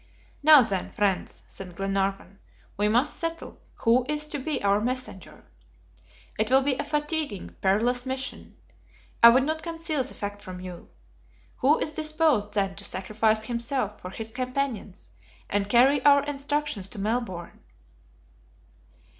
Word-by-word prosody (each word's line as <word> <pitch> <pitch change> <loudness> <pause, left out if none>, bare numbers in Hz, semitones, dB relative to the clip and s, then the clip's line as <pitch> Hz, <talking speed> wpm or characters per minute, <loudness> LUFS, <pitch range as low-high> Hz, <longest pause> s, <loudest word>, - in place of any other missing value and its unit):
"Now, 300 -2 +8
then, 195 -4 -3
friends," 200 -3 -1
said 185 -3 -10
Glenarvan, 195 0 -2 0.4
"we 205 +1 +1
must 245 +7 +1
settle 330 0 -5
who 240 +2 +3
is 300 0 0
to 300 -1 -5
be 295 +3 -2
our 200 +1 +3
messenger. 250 -5 -4 1.0
It 215 +1 +1
will 265 +1 +5
be 280 0 +2
a 255 - -3
fatiguing, 295 - -2
perilous 230 +6 +2
mission. 260 0 -5 0.6
I 235 - +11
would 255 +3 +5
not 315 +2 -2
conceal 330 -3 -2
the 260 - -10
fact 205 0 -6
from 185 -2 -8
you. 180 -1 -9 0.7
Who 285 +4 +4
is 305 - -2
disposed, 310 -9 +1
then, 195 -1 0
to - - -7
sacrifice 215 +3 0
himself 235 -1 -3
for 180 - -7
his 225 +3 -6
companions 255 -5 -4 0.4
and 200 0 0
carry 255 +4 +4
our 285 -1 +6
instructions 285 -7 -2
to - - -10
Melbourne?" 205 -5 -3
240 Hz, 140 wpm, -26 LUFS, 200-285 Hz, 1.0 s, I